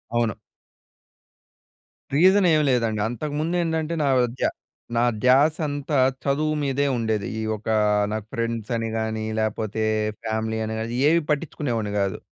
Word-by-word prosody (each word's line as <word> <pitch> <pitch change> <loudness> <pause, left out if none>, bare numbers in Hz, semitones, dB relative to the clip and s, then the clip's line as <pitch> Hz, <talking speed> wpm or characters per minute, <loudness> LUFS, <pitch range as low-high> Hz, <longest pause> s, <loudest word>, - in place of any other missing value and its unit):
అవును. 115 -3 +2 1.8
రీజన్ 190 +5 +5
ఏమి 155 - +3
లేదండి. 115 -3 +1
అంతకుముందు 150 +7 -2
ఏంటంటే 160 0 -1
నా - - +1 0.3
ధ్య - - 0 0.5
నా 115 - +3 0.2
ధ్యాస 140 +5 +5
అంతా 145 0 -2 0.3
చదువు 155 +2 +1
మీదే 140 0 0
ఉండేది. 110 -3 -1
ఈ - - -2
ఒక 105 - -12 0.4
నాకు 110 -1 -3
ఫ్రెండ్స్ 115 -3 -3
అని 115 -1 -2
గాని 110 0 -2 0.2
లేపోతే 110 0 -2 0.4
ఫ్యామిలీ 110 0 -2
అని 110 - -3
గాని 115 +3 -3
ఏవి 165 +2 +4
పట్టించుకునేవాడిని 135 -8 -1
కాదు. 100 -1 0
120 Hz, 130 wpm, -24 LUFS, 110-150 Hz, 1.8 s, రీజన్